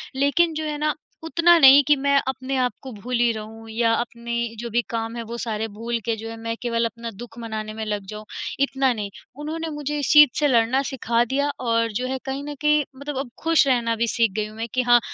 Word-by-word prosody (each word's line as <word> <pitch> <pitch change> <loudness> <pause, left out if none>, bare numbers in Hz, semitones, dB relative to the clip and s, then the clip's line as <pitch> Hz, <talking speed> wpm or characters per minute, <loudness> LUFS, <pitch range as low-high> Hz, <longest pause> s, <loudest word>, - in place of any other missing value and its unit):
लेकिन 315 +5 +2
जो 315 - -3
है 300 -1 -3
ना 300 0 0 0.3
उतना 335 +1 +4
नहीं 275 +1 +9
कि 295 - +4
मैं 280 0 +1
अपने 265 0 -3
आप 250 - +1
को 265 - -8
भूली 240 +2 0
रहूँ 220 +1 -9
या 230 +1 +1
अपने 235 0 -3 0.3
जो 235 - -5
भी 240 +2 +1
काम 225 0 -3
है, 235 - -4
वो 235 +1 -6
सारे 220 -2 -3
भूल 230 +2 -4
के 230 -1 0
जो 225 +1 -7
है 225 - -6
मैं 230 0 -4
केवल 230 -1 0
अपना 230 0 -5
दुःख 230 +3 -11
मनाने 215 -2 -5
में 220 0 -5
लग 210 -2 -3
जाऊँ, 215 0 -8 0.3
इतना 270 -1 +2
नहीं। 205 -3 -4 0.3
उन्होंने 320 +2 -4
मुझे 295 0 -3
इस 280 - 0
चीज़ 295 -2 +9
से 295 - +3
लड़ना 245 +1 +3
सिखा 240 -3 +1
दिया 280 +4 0
और 230 -2 +1
जो 250 +5 -2
है 265 +1 -2
कहीं 270 +1 -3
न 295 0 -6
कहीं 300 0 +4
मतलब 280 +1 -6
अब 270 -2 -4
खुश 325 -3 +4
रहना 235 -3 +2
भी 235 +1 0
सीख 230 -2 +2
गई 215 -1 0
हूँ 215 - -12
मैं 225 +1 -3
कि 255 - +2
हाँ, 240 -1 +5
240 Hz, 240 wpm, -23 LUFS, 225-280 Hz, 0.3 s, नहीं